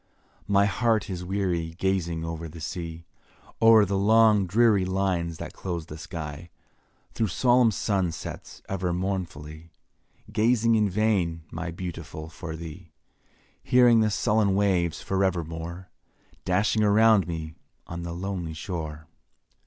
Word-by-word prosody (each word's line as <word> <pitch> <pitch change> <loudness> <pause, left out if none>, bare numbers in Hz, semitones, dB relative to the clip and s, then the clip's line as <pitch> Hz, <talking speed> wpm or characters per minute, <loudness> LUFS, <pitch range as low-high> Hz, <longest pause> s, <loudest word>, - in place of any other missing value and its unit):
My 100 -1 +4
heart 110 +1 +1
is 90 -1 -4
weary 90 -4 -2
gazing 85 -4 -1
o'er 80 0 -5
the 80 +1 -11
sea; 85 +1 -6 0.6
O'er 115 -2 +7
the 100 0 -1
long 105 -1 +5
dreary 105 0 +4
lines 90 -3 -1
that - - -7
close 85 -4 -5
the 75 - -9
sky; 80 -1 -7 0.6
Through 110 - 0
solemn 120 +5 +4
sun 95 -4 0
sets - - -8
ever 90 -2 -2
mournfully, 85 -4 -4 0.6
Gazing 115 +1 +3
in 105 -2 +3
vain, 95 -5 0
my 85 +2 -4
Beautiful, 85 -2 -7
for 80 0 -7
thee; 80 +1 -9 0.7
Hearing 125 -2 +5
the 110 -1 +3
sullen 105 -1 +2
waves 90 -5 +1
for 95 0 0
evermore 85 0 -3 0.5
Dashing 105 +4 +2
around 105 -1 +5
me 80 -2 -5 0.3
on 85 0 -6
the 85 0 -5
lonely 90 -2 -4
shore. 80 -2 -5
90 Hz, 130 wpm, -26 LUFS, 85-105 Hz, 0.7 s, O'er